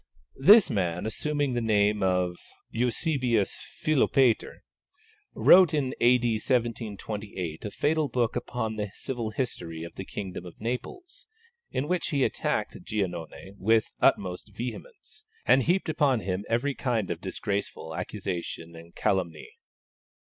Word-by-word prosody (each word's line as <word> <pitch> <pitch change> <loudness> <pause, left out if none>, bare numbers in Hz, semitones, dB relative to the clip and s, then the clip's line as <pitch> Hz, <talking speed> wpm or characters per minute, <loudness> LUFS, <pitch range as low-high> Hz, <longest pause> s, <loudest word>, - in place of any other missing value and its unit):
This 205 +10 +8
man, 90 -2 -1
assuming 145 +4 -1
the 120 - 0
name 105 -2 +2
of 90 -2 +1 0.4
Eusebius 125 - 0 0.2
Philopater, 135 -5 +2 0.7
wrote 180 -3 +7
in 135 -3 0
A.D. 120 0 +4
1728 105 - -3
a 105 - -3
fatal 155 +7 +1
book 120 -2 0
upon 110 -3 -3
the 105 -1 -2
civil 120 -4 -4
history 85 -9 -4
of 85 - -8
the 95 - -6
kingdom 95 -2 -6
of 90 -2 -12
Naples, 235 - -5 0.4
in 135 - -2
which 180 0 0
he 140 -3 +1
attacked - - -1
Giannone 95 -2 -4
with 110 +2 +2
the - - +6
utmost 90 +2 -1
vehemence, 430 - -7 0.2
and 135 - +5
heaped 175 +8 +1
upon 145 -7 +2
him 95 +1 -3
every 120 +5 +1
kind 120 -8 -1
of 85 0 -4
disgraceful 100 -4 -3
accusation 90 -3 -5
and 85 +1 -13
calumny. 85 -5 -1
110 Hz, 130 wpm, -27 LUFS, 95-130 Hz, 0.7 s, This